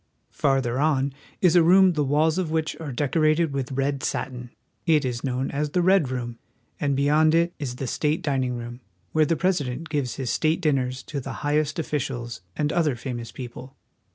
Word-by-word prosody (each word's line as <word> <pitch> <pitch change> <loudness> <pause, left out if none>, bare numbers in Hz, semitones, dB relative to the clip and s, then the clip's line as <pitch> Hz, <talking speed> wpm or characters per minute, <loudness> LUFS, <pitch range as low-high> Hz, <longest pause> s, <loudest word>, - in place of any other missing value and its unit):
Farther 135 -3 +1
on 140 -2 +1 0.3
is 180 -2 +4
a 175 - +7
room 185 +2 +6
the 150 -2 +1
walls 155 +5 +2
of 180 -4 -1
which 160 -1 -1
are 155 -4 -5
decorated 155 +3 +1
with 135 -2 -3
red 135 +1 -1
satin; 125 -3 -3 0.4
it 155 -4 +4
is 125 -2 -3
known 130 0 -1
as 150 +1 -1
the 175 +4 +1
Red 185 -6 +4
Room; 120 -2 -4 0.4
and 140 -1 +1
beyond 150 +3 +3
2^ - - +4
WASHINGTON. 170 +1 +2
it - - -4
is 125 -3 -4
the 135 - -4
state 150 +5 -1
dining 130 -4 0
room, 120 +1 -7 0.3
where 155 -1 +3
the 165 - +2
President 165 -5 -1
gives 140 -6 -1
his 130 -4 -2
state 155 +7 +1
dinners 135 -6 0
to 145 - -5
the 130 - -6
highest 150 0 +1
officials 130 - -3
and 150 0 0
other 155 -6 +2
famous 120 -1 -6
peo 125 -2 -7
ple. 130 +3 -11
145 Hz, 200 wpm, -25 LUFS, 130-155 Hz, 0.4 s, a